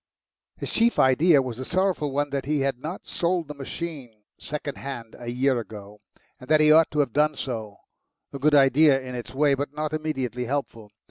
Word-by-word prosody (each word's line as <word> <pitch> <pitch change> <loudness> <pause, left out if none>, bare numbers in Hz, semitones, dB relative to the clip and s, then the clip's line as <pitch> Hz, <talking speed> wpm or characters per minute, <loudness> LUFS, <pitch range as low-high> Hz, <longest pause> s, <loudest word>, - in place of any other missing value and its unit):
His - - -5
chief 235 +1 +2
idea 140 +3 +5
was 125 -3 -6
the 130 - -5
sorrowful 180 -2 0
one 145 +1 -1
that 140 -1 -2
he 150 0 0
had 135 -2 -1
not 160 +7 -6
sold 175 -3 -1
the 150 - -6
machine 135 -6 -7 0.2
second 145 -1 -5
hand 120 -5 -7
a 120 - -6
year 130 +1 +1
ago, 105 -2 -10 0.4
and 125 - -13
that 155 0 +5
he 155 0 +5
ought 160 +1 +6
to 150 - +1
have 135 -5 -2
done 150 +1 +2
so 110 -5 -5 0.6
a 140 - -5
good 150 +2 +3
idea 140 +1 +5
in 130 -1 -8
its 125 +1 -7
way, 145 0 +3
but 140 +1 -3
not 155 0 -3
immediately 135 -6 -3
helpful. 115 -5 -4
140 Hz, 200 wpm, -25 LUFS, 125-155 Hz, 0.6 s, ought